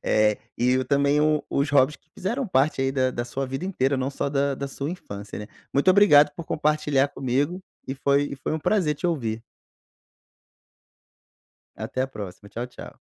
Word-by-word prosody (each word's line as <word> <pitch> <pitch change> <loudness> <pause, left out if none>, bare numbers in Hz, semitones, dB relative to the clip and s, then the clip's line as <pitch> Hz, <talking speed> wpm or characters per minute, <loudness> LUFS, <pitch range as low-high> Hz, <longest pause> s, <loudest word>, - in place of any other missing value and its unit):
Eh, 105 -1 +2 0.2
e 125 +2 +2
também 140 +1 +3
o 155 0 +2
os 140 +2 +1
hobbies 145 0 +4
que - - -40
fizeram 235 +5 -2
parte 135 -1 +2
aí 135 0 +1
da 130 -1 +1
da 120 - -3
sua 130 +3 -4
vida 135 +7 -4
inteira. 135 -8 0
Não 130 +1 -1
só 140 - -2
da 140 0 +1
da 140 +1 -4
sua 140 +1 -5
infância, 100 - -7
né? 105 - -7 0.3
Muito 140 +7 +4
obrigado 185 -7 +7
por 170 - -8
compartilhar 150 -2 +1
comigo. 140 +7 -1 0.2
E 135 - -3
foi 140 +1 +2
e - - -5
foi 130 - -4
um 160 - 0
prazer 160 -1 +1
te 175 - -3
ouvir. 115 -9 -2 2.3
Até 130 - -3
a 130 - 0
próxima. 100 -5 -9
Tchau, 120 +3 -5
tchau. 125 - -12
140 Hz, 185 wpm, -25 LUFS, 130-150 Hz, 2.3 s, obrigado